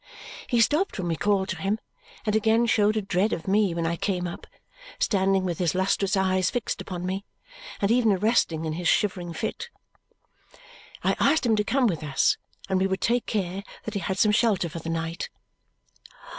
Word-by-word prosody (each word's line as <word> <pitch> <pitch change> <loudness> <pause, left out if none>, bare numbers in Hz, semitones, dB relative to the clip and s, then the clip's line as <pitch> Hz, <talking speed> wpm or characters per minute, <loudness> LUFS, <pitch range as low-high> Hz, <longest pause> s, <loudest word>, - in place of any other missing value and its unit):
He 240 -3 +2
stopped 305 - +2
when 185 -3 -3
we 165 - 0
called 195 +2 +1
to - - -2
him 200 +3 0 0.5
and 210 -1 +1
again 220 +2 +3
showed 215 -2 +3
a 215 - -1
dread 195 +2 +1
of 165 - -5
me 200 -3 +2
when 170 -1 -1
I 170 +1 0
came 180 -1 -1
up, 175 - -7 0.5
standing 195 -1 +2
with 175 -3 -2
his 175 -1 +1
lustrous 195 +1 +1
eyes 185 -1 +2
fixed 245 -3 -3
upon 180 -1 -5
me, 190 +2 -2 0.6
and 200 +1 +1
even 235 -2 +4
arrested 190 -5 +1
in 155 - -2
his 175 +1 -2
shivering 180 -3 +1
fit. 445 - -4 1.3
I - - +2
asked 285 0 +3
him 225 -2 +3
to 210 - +1
come 260 +5 +1
with 175 -9 0
us, 140 -2 +2 0.3
and 190 - +1
we 190 - +3
would 190 0 -1
take 240 +1 +1
care 195 -2 -2 0.2
that - - -5
he 200 - -1
had 190 -1 -3
some 210 +1 +4
shelter 210 -5 +2
for 165 +1 -6
the 165 - -6
night. 165 +1 -3
195 Hz, 195 wpm, -26 LUFS, 175-215 Hz, 1.3 s, even